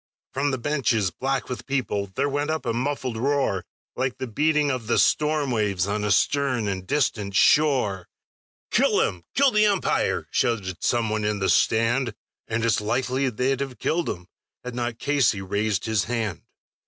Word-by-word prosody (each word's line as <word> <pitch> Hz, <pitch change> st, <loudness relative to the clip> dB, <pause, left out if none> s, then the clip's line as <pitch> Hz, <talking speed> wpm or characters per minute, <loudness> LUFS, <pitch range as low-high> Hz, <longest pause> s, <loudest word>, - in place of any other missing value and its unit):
From 140 Hz, +2 st, 0 dB
the 130 Hz, -, -1 dB
benches, 120 Hz, -7 st, 0 dB
black 135 Hz, +7 st, -2 dB
with 125 Hz, -, -6 dB
people, 120 Hz, -7 st, -1 dB
there -, -, +1 dB
went 145 Hz, +1 st, -1 dB
up 160 Hz, 0 st, -2 dB
a 115 Hz, -, 0 dB
muffled 130 Hz, -1 st, -2 dB
roar, 135 Hz, -7 st, 0 dB, 0.3 s
Like 130 Hz, 0 st, -2 dB
the -, -, -4 dB
beating 150 Hz, +4 st, +1 dB
of 125 Hz, -4 st, -4 dB
the 115 Hz, -, +2 dB
storm 150 Hz, -2 st, +2 dB
waves 100 Hz, -6 st, 0 dB
on 105 Hz, +1 st, -2 dB
a 105 Hz, -, 0 dB
stern 130 Hz, -1 st, +1 dB
and 95 Hz, -2 st, -4 dB
distant 105 Hz, -9 st, 0 dB
shore; 125 Hz, -, +3 dB, 0.6 s
"Kill -, -, +3 dB
him! 90 Hz, -2 st, -2 dB
Kill 275 Hz, 0 st, +4 dB
the 215 Hz, -1 st, +4 dB
umpire!" 200 Hz, -3 st, 0 dB
shouted 100 Hz, -6 st, -1 dB
some 115 Hz, -3 st, +1 dB
one 110 Hz, 0 st, -1 dB
in 105 Hz, 0 st, 0 dB
the 95 Hz, -1 st, 0 dB
stand. 115 Hz, +5 st, +2 dB, 0.3 s
And 115 Hz, +1 st, -1 dB
it's 110 Hz, -2 st, +2 dB
likely 130 Hz, +4 st, 0 dB
they'd 125 Hz, +3 st, -1 dB
have 135 Hz, -3 st, -4 dB
killed 170 Hz, +1 st, -1 dB
him 90 Hz, 0 st, -5 dB, 0.4 s
had 125 Hz, 0 st, -6 dB
not 120 Hz, -1 st, -3 dB
Casey 140 Hz, -6 st, +1 dB
raised 105 Hz, +2 st, -1 dB
his 110 Hz, -6 st, +1 dB
hand. 110 Hz, -8 st, -2 dB
120 Hz, 175 wpm, -24 LUFS, 105-140 Hz, 0.6 s, Kill